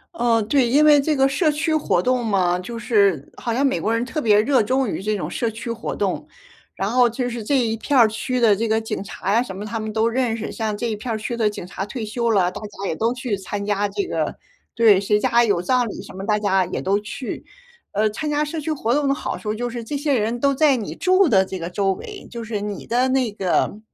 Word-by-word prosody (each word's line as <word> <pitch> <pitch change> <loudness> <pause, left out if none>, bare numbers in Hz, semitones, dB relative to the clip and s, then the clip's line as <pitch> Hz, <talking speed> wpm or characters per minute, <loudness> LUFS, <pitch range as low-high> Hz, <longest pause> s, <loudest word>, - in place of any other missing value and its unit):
哦， 235 -5 +2
对， 245 +4 +2
因 280 +6 +4
为 300 -1 +7
这 300 +2 +1
个 270 -1 +4
社 305 +4 +1
区 315 +2 -1
活 310 - +1
动 250 -1 0
嘛， 180 -4 +1
就 230 +6 -7
是 200 - +1
好 235 - -3
像 270 +4 +1
美 270 - +1
国 220 +2 0
人 230 - 0
特 305 +4 -3
别 210 -4 +4
热 260 +2 +3
衷 260 +4 +1
于 195 - -3
这 215 +2 -1
种 200 - -4
社 230 - -1
区 225 +2 -6
活 230 0 -4
动。 - - -2 0.5
然 195 - -2
后 245 +1 +4
就 245 +2 -2
是 235 -2 -5
这 280 +6 +1
一 225 -2 0
片 280 +5 0
儿 235 -3 +7
区 250 +4 -2
的 225 -4 +5
这 225 +3 -1
个 220 0 +1
警 220 -3 -4
察 195 -1 -4
呀 230 +4 +3
什 190 -7 -8
么 195 - -6
他 225 +1 -4
们 215 0 -5
都 225 +1 +2
认 240 -1 0
识， 225 - -5
像 220 -2 -2
这 235 +3 -3
一 220 - -2
片 230 +2 -4
儿 - - -1
区 235 +2 -4
的 220 -2 +2
警 205 - -7
察 195 - -5
退 225 +3 -6
休 235 +2 -1
了， 185 -4 +2
大 - - -7
家 205 -2 -6
也 160 - -2
都 230 +5 0
去 240 -4 -3
参 200 +1 -5
加 205 0 0
这 300 - -2
个 - - -2 0.4
对， 220 -4 +6
谁 205 +1 +2
家 235 +3 +3
有 200 -6 +1
葬 245 +5 +1
礼 210 - -6
什 - - -12
么， 190 +1 -6
大 210 0 +2
家 190 -3 +2
也 - - -4
都 200 +2 +1
去。 210 +5 -6 0.5
呃， 215 +2 +1
参 300 +8 -4
加 295 0 +1
社 300 +2 -4
区 310 +1 -3
活 245 -6 0
动 290 +1 +1
的 275 - +3
好 - - -4
处 210 -1 -3
就 240 +2 -3
是 235 0 -6
这 255 +6 -5
些 285 -2 +1
人 225 +2 -1
都 280 +2 +2
在 290 -1 +4
你 215 - -5
住 370 0 +3
的 190 -5 +4
这 190 0 -6
个 170 +1 -4
周 195 +1 0
围， 410 - -9
就 235 -1 -6
是 220 -2 -3
你 205 -1 -5
的 245 +2 +2
那 260 -3 +1
个 200 +1 0
230 Hz, 290 characters per minute, -22 LUFS, 205-255 Hz, 0.5 s, 为